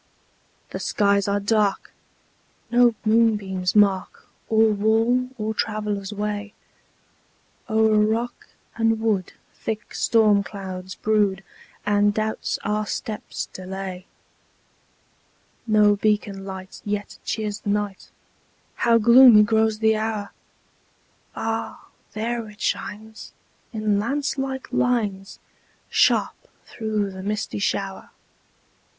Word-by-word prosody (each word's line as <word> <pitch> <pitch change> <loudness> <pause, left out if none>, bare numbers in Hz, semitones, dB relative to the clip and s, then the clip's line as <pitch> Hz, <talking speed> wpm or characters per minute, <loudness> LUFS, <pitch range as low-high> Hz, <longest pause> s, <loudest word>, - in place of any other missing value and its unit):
The - - -4
skies 200 -1 +1
are 200 0 +1
dark! 205 -1 0 0.8
No 240 -1 +5
moonbeams 210 -5 +2
mark 200 -2 +2 0.2
Or 220 0 +4
wall, 225 +4 +2
or 215 0 -2
traveller's 210 -2 -2
way: 205 0 -4 1.1
O'er 220 -1 +3
rock 225 +3 -1 0.3
and 225 -1 +1
wood 210 -5 -1 0.2
thick 220 0 -5
storm 215 -3 +3
clouds 190 -2 -7
brood, 205 -3 +1 0.4
And 205 0 +2
doubts 220 0 -2
our 210 0 -1
steps 215 0 -4
delay. 185 0 -7 1.6
No 210 -1 +4
beacon 205 -2 -1
light 190 -1 -8
yet 205 -1 -4
cheers 210 -2 -3
the - - -5
night: 205 -1 -2 0.7
How 235 -1 +4
gloomy 235 -1 +8
grows 220 0 +2
the 220 0 +2
hour! 215 -2 -3 1.0
Ah! 225 0 -4 0.2
there 230 +1 -3
it 210 - -16
shines, 220 +1 -4 0.4
in 215 -2 0
lance 275 +6 -1
like 265 -1 -4
lines, 210 -6 0 0.5
Sharp - - +2 0.2
through 215 -3 -2
the 190 0 -8
misty 210 +1 -3
shower. 195 -1 -2
210 Hz, 105 wpm, -23 LUFS, 200-220 Hz, 1.6 s, gloomy